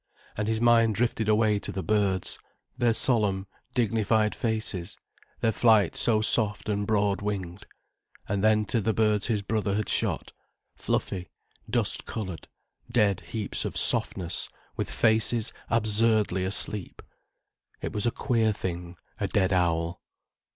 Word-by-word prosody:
And 105 0 -2
his 110 0 0
mind 115 -2 +4
drifted 115 0 0
away 105 -1 +3
to - - -4
the 95 - -4
birds, 100 -3 0 0.4
their 120 -2 +2
solemn, 105 -7 +1 0.3
dignified 110 -2 +2
faces, 110 -5 -3 0.4
their 115 - +3
flight 110 -4 +3
so 110 -2 +3
soft 105 -1 +2
and 100 -1 -1
broad 100 -2 +1
winged. 100 -1 -4 0.6
And 100 0 -1
then 110 0 +4
to 115 +2 0
the 110 +2 0
birds 105 -2 +2
his 105 -4 0
brother 105 -1 -1
had 105 -1 -1
shot, - - -1 0.4
fluffy, 90 -2 -2 0.4
dust - - 0
coloured, 95 -7 -5 0.4
dead 105 -6 +3
heaps 110 -3 -4
of - - -4
softness 85 -3 0 0.3
with - - -3
faces 110 0 +2 0.2
absurdly 110 -4 +2
asleep. 100 0 -1 0.8
It - - -5
was 105 +3 0
a - - +2
queer 115 -4 +1
thing, 90 -2 -5 0.2
a - - 0
dead 95 -2 +1
owl. 85 -2 0
105 Hz, 135 wpm, -27 LUFS, 95-110 Hz, 0.8 s, mind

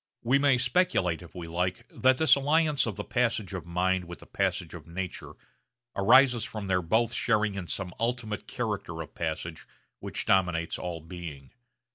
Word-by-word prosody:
We 130 +4 +3
may 140 -2 +4
speculate, 120 - +2
if 85 0 -13
we 85 -2 -6
like, 90 +2 -2
that 130 0 +3
this 160 - +5
alliance 150 0 +3
of 110 - -3
the - - -4
passage 115 -6 0
of 90 -3 -5
mind 90 +1 +1
with 85 0 -8
the - - -15
passage - - -1
of 85 -3 -10
nature 90 +2 -5 0.6
arises 120 +3 +5
from 110 -3 -5
their 95 -1 +1
both 110 +7 +1
sharing 110 -3 +1
in 95 -3 -5
some 90 0 -4
ultimate 115 -2 -2
character 105 -8 -3
of 75 - -15
passage 80 0 -4 0.3
which - - -4
dominates 90 -3 +1
all 85 -2 -4
being. 80 -5 -9
95 Hz, 170 wpm, -28 LUFS, 85-120 Hz, 0.6 s, this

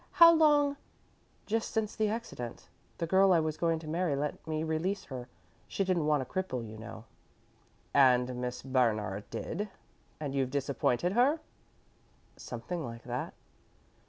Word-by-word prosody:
How 335 -1 +9
long 295 -3 +4 0.3
" - - -36
"Just 225 +1 -1
since 220 -2 -1
the 215 - +1
accident. 210 - -5 0.3
The 170 - -1
girl 190 +3 +5
I 175 - +6
was 155 -1 -1
going 165 -1 +1
to 160 -1 -9
marry 165 -1 0
let 145 +3 -3
me 155 0 -1
release 170 +5 -1
her. 125 -2 -7 0.4
She 195 - -1
didn't 180 -5 +1
want 150 -3 +3
a - - -9
cripple, 130 -9 -3
you 110 - -9
know." 110 0 -9 0.9
"And 125 -2 +4
Miss 125 0 -4
Bernard 110 -6 0
did, 205 +5 -4 0.5
and 145 -3 -3
you've 135 -2 0
disappointed 140 +3 0
her?" 265 +8 +4 1.0
"Something 175 -3 -5
like 115 -2 -7
that." 125 0 -4
155 Hz, 155 wpm, -31 LUFS, 125-190 Hz, 1.0 s, How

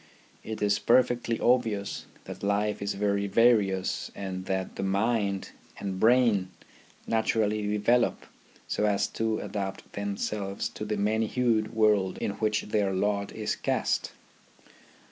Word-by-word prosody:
It 110 -1 -4
is 105 0 +2
perfectly 120 -2 +2
obvious 115 -5 +1 0.2
that - - -8
life 100 +1 0
is 100 0 -2
very 100 0 0
various 100 -3 +2
and 95 -1 -5
that 95 -1 -2
the - - -4
mind 100 0 0 0.3
and 95 -2 -4
brain 115 -5 +4 0.6
naturally 110 -2 +1
develop 110 +4 +1 0.4
so 105 - 0
as 100 -1 +2
to 110 -1 -1
adapt 95 -2 -5
themselves 100 0 -3
to 105 - -6
the 105 - -2
many 110 +2 +1
hued 115 -3 0
world 105 -4 +3
in - - -2
which 110 -1 0
their 105 -2 0
lot 100 +1 0
is - - -2
cast. - - -1
105 Hz, 130 wpm, -28 LUFS, 100-110 Hz, 0.6 s, brain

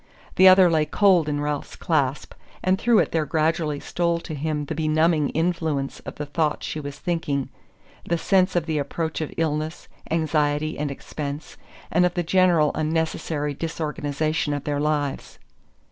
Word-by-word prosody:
The 190 - +7
other 185 0 +8
lay 160 -3 +2
cold 180 -3 +3
in 145 0 -1
Ralph's 145 -1 -3
clasp, 145 -4 -1 0.3
and 185 +1 +2
through 235 0 +3
it - - +2
there 160 -2 0
gradually 155 -1 0
stole 170 +1 -1
to 160 - -7
him 150 0 -2
the 160 - -4
benumbing 155 -1 +2
influence 160 -4 -1
of - - -6
the 150 - -4
thoughts 150 +1 -1
she 155 - -4
was 145 -1 -7
thinking: 145 -6 -2 0.5
the 170 - 0
sense 185 +2 +2
of 175 -3 +1
the 160 -2 -1
approach 160 +3 -3
of 155 - -3
illness, 155 0 -2 0.2
anxiety, 155 -1 0
and 150 -1 -1
expense, 140 +1 -6 0.4
and 175 +2 +3
of 180 0 +1
the 175 - 0
general 170 -3 +3
unnecessary 155 -1 -1
disorganization 155 -1 -2
of 145 - -5
their 145 -1 -1
lives. 145 -2 -2
155 Hz, 160 wpm, -24 LUFS, 145-170 Hz, 0.5 s, other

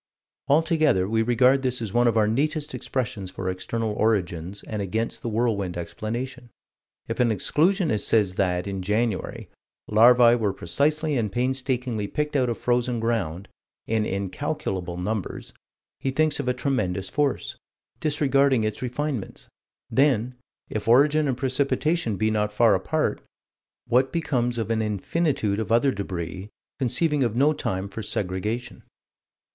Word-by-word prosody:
Altogether 155 - +3
we 110 +2 +1
regard 125 +3 +4
this 125 -1 0
as 110 -4 -5
one 120 0 +4
of 115 -1 +2
our 105 -1 +4
neatest 150 +6 -1
expressions 105 -7 -3
for 95 0 -6
external 110 +4 -3
origins 95 -4 -1
and 105 -2 -4
against 110 +4 -2
the 120 - -3
whirlwind 105 -6 -1
explanation. 120 +8 -5 0.6
If - - -4
an 125 -1 +4
exclusionist 155 - +1
says 105 -5 +2
that, 90 -2 0
in 100 -1 -4
January, 105 +1 -1 0.4
larvae 120 +2 +6
were 110 -5 +1
precisely 150 - 0
and 110 -4 -1
painstakingly 125 -3 -1
picked 150 +4 -2
out 130 -3 +2
of 115 - -2
frozen 120 -1 0
ground, 100 -6 -2 0.4
in 110 -1 0
incalculable 95 - -3
numbers, 100 +2 -4 0.5
he 135 - -1
thinks 155 +2 +1
of - - -3
a 125 - +2
tremendous 95 -9 -1
force 145 +2 -1 0.4
disregarding 140 -4 +2
its 110 -1 -2
refinements: 130 -2 -4 0.4
then 130 -3 +2 0.3
if 110 0 -4
origin 145 +5 +5
and 130 -3 -1
precipitation 140 - 0
be 110 +2 +1
not 105 -1 0
far 110 0 +4
apart, 95 -1 0 0.6
what 130 +3 +2
becomes 130 -8 -1
of 115 0 -2
an 110 -1 +1
infinitude 110 - 0
of 110 - -3
other 120 +4 +4
débris, 95 0 -5 0.3
conceiving 145 +3 +1
of 115 -3 -1
no 145 +5 +4
time 95 -9 -3
for 100 +3 -7
segregation? 105 +4 -3
115 Hz, 140 wpm, -25 LUFS, 100-135 Hz, 0.6 s, larvae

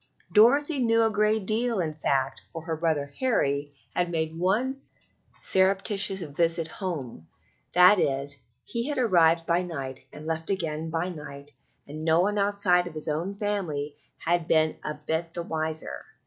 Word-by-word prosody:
Dorothy 280 +7 +5
knew 230 -2 +3
a 225 - +2
great 215 -1 +1
deal, 225 +1 0
in 160 -3 -1
fact, 135 -3 -1
for 165 -2 -7
her 160 -1 -3
brother 155 -3 -1
Harry 145 - 0 0.2
had 175 -1 +1
made 160 -1 -1
one 225 +11 0 0.6
surreptitious 195 +1 +2
visit 165 +1 0
home; 145 - -6 0.5
that 180 +3 +7
is, 140 -1 -1 0.3
he 235 +2 -3
had 295 - -2
arrived 170 -8 +3
by 170 +1 +2
night 135 -7 -5
and 150 +1 -10
left 160 0 -3
again 160 -4 -2
by 165 +2 -1
night, 145 -4 -9 0.4
and 155 +2 -7
no 160 +1 +4
one 205 +2 +1
outside 200 -3 +2
of 165 - -9
his 155 - -5
own 165 +6 -2
family 175 -9 -3 0.2
had 170 0 0
been 155 0 +2
a 150 - -3
bit 160 +2 -3
the 170 - -3
wiser. 160 -1 -2
170 Hz, 160 wpm, -26 LUFS, 155-200 Hz, 0.6 s, that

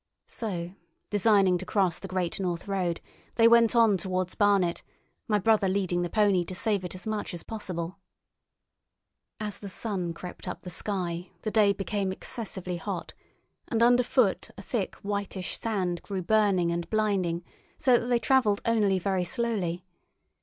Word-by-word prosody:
So, 180 -6 -4 0.4
designing 200 -3 +4
to 185 - -5
cross 185 -4 +1
the - - -7
Great 185 -2 -2
North 175 -2 -2
Road, 185 -4 -1 0.3
they 230 -1 +6
went 235 0 +5
on 225 -4 +5
towards 185 0 -2
Barnet, 200 -4 +2 0.5
my 210 -3 +3
brother 205 -1 +3
leading 185 -2 0
the 175 - -2
pony 200 -3 +3
to 185 - -6
save 205 -2 0
it 180 0 -6
as 185 - -7
much 215 -4 -3
as 170 - -6
possible. 180 -5 -5 1.4
As 210 -2 -4
the 200 - -7
sun 185 -4 -2
crept 180 +2 -8
up 180 - -5
the 180 - -7
sky 180 -2 -3
the 215 - -2
day 210 -2 +5
became 200 -1 -2
excessively 190 -3 -4
hot, 165 - -5 0.5
and 230 0 +1
under 245 +1 +6
foot 250 -5 +1
a 200 - -9
thick, 205 -2 -2
whitish 200 -2 -3
sand 185 -6 -1
grew 195 -3 -4
burning 195 -3 +3
and 170 0 -3
blinding, 195 -6 0 0.3
so 250 -2 +4
that 235 - -5
they 245 -1 +3
travelled 235 -5 +2
only 210 -4 +3
very 185 0 0
slowly. 190 -5 -1
195 Hz, 160 wpm, -28 LUFS, 180-215 Hz, 1.4 s, they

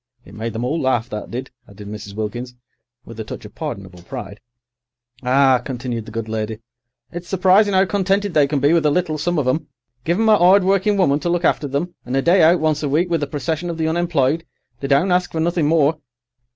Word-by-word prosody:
It - - -14
made 110 +1 -5
them 115 +2 -3
all 155 +6 -1
laugh, 120 -3 0
that 105 -1 -5
did," 125 +2 -6 0.2
added 100 0 -11
Mrs. 105 -1 -8
Wilkins, 120 +4 -5 0.5
with 115 -1 -11
a - - -3
touch 105 - -8
of - - -12
pardonable 95 -3 -7
pride. 100 +3 -8 0.8
"Ah," 130 0 +3
continued 120 -3 -4
the - - -8
good 115 0 -4
lady, 110 0 -3 0.5
"it's 175 0 -8
surprising 190 +2 +3
'ow 190 +1 +5
contented 195 0 0
they 150 -3 +4
can 145 0 -1
be 145 +4 +3
with 165 -3 +3
a - - +4
little, 155 -1 0
some 175 +3 -1
of 145 -4 0
'em. 145 +4 0 0.4
Give 170 +4 0
'em 225 - +2
a - - +7
'ard 185 +2 +5
working 195 +2 +2
woman 145 -7 +3
to 175 - -2
look 175 0 0
after 145 - +1
them, 145 +6 -3
and 125 +2 -2
a - - +2
day 175 +2 +4
out 165 +2 +5
once 155 -1 0
a 145 - -1
week 170 +5 +1
with 165 -2 +1
a 145 - -1
procession 155 +4 -3
of 170 - -4
the 160 -1 0
unemployed, 160 -2 +1 0.4
they 140 - -4
don't 140 +7 +2
ask 180 0 +1
for 160 - -2
nothing 170 -1 +1
more. 155 -1 +2
150 Hz, 230 wpm, -20 LUFS, 125-175 Hz, 0.8 s, a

